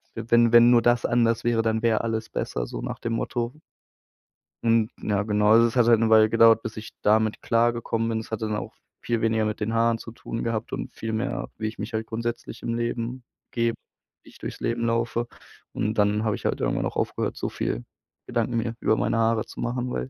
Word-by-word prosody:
wenn 120 +1 +3
wenn 120 0 +8
nur 120 -1 +6
das 120 0 +2
anders 115 -1 +2
wäre, 120 -1 +2
dann 110 0 0
wäre 115 -2 +3
alles 110 -1 -3
besser, - - -3
so - - -6
nach - - -5
dem 115 - -3
Motto. 120 +2 -2 1.1
Und 115 -1 +3
ja, 105 -1 0
genau. 105 0 +2
Also, 115 +1 +6
es 115 - -5
hat 120 -2 +4
halt 115 -2 +6
'ne 115 - +2
Weile 110 -1 +6
gedauert, 115 0 +6
bis 110 -1 -6
ich 110 0 -8
damit 110 0 +2
klargekommen 115 -1 +1
bin. 115 -1 -1
Das 110 - -13
hat 110 - -3
dann 110 -1 -1
auch - - -5 0.3
viel 120 -1 -1
weniger 110 0 +1
mit 110 0 -2
den 110 +1 -2
Haaren 115 0 +2
zu 115 - -10
tun 115 - -6
gehabt 115 -1 -3
und - - -5
viel 115 - -4
mehr, 110 +3 -2
wie 110 - -2
ich 110 - -6
mich 105 +3 -5
halt 110 -1 -2
grundsätzlich 115 +1 -5
im 115 - -2
Leben 120 +1 -3 0.3
gebe, 115 -1 0 0.5
wie - - -16
ich - - -17
durchs - - -7
Leben 115 0 -1
laufe. 115 +1 0 0.5
Und 110 +1 -1
dann 105 +1 +2
habe 110 -2 0
ich - - -13
halt - - -1
irgendwann - - 0
auch - - -4
aufgehört, - - -1
so - - -3
viel - - -3 0.4
Gedanken 120 0 -1
mir 115 0 -1
über 110 - +2
meine 110 +2 0
Haare 115 -1 +2
zu - - -12
machen, 125 +1 -2
weil 130 - -3
115 Hz, 225 wpm, -25 LUFS, 110-115 Hz, 1.1 s, wenn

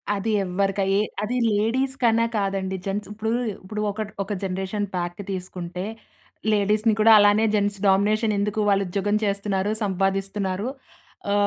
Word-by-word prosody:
అది 205 +3 -1
ఎవ్వరికై 195 +1 0 0.3
అది 240 +4 -2 0.2
లేడీస్ 245 +6 +1
కన్నా 230 -1 +4
కాదండి. 195 -1 -1
జెంట్స్ 200 +1 -3
ఇప్పుడు 220 +1 -3 0.3
ఇప్పుడు 210 +3 -5
ఒక 215 +2 -5 0.2
ఒక 205 +2 -4
జనరేషన్ 190 +2 -2
ప్యాక్ 175 +1 -3
తీసుకుంటే 180 -1 -5 0.7
లేడీస్‌ని 210 +2 +2
కూడా 225 +1 +6
అలానే 205 +2 +5
జెంట్స్ 205 -1 0
డామినేషన్ 210 +3 +3
ఎందుకు 210 +1 -1
వాళ్ళు 200 0 +3
ఉద్యోగం 200 +3 0
చేస్తున్నారు? 200 0 0
సంపాదిస్తున్నారు? 195 +1 -1 0.6
ఆ! - - +3
200 Hz, 130 wpm, -24 LUFS, 190-215 Hz, 0.7 s, కూడా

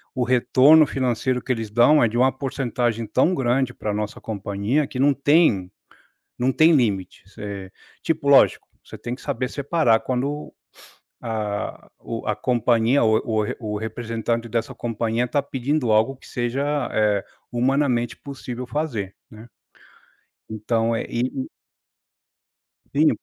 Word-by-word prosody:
o 130 - 0
retorno 130 +5 +5
financeiro 130 -1 -1
que 130 - -2
eles 115 -3 -2
dão, 120 +7 +5
é, - - +4
de 115 +2 -3
uma 130 +2 +4
porcentagem, 125 -4 -2
tão 130 - +2
grande 130 -1 +1
para 105 - -4
a - - -3
nossa 105 0 -4
companhia, 105 +7 -2
que 130 - -7
não 140 +2 +4
tem 140 - +3 0.7
não 125 +2 +1
tem 160 +5 +5
limites. 100 -6 -2
É, 100 -2 -7 0.3
tipo, 160 -3 -1
lógico, 140 -1 +5 0.2
você - - -11
tem 120 +1 -5
que - - -17
saber 130 -3 -2
separar 140 -5 +1
quando 140 +4 -3 0.7
a 110 -3 -4
o 115 -1 -6
a 105 - +1
companhia, 120 +2 +2
o 110 -1 +4
o 110 -3 0 0.3
o - - -1
representante 115 +1 -3
dessa 115 +1 -2
companhia, 115 +1 -1
tá 145 +4 0
pedindo 135 -1 -1
algo 110 +5 +3
que - - -17
seja, 140 +5 -1
eh, 105 -2 +2 0.3
humanamente, 125 -1 +1
possível 125 -3 -7
fazer, 120 -10 -3 0.2
né. 110 +2 -12 1.0
Então, 115 +1 0
é, - - -2
e 120 +2 0 0.2
e - - -10 1.5
Sim, 155 +2 +5
120 Hz, 145 wpm, -23 LUFS, 110-135 Hz, 1.5 s, retorno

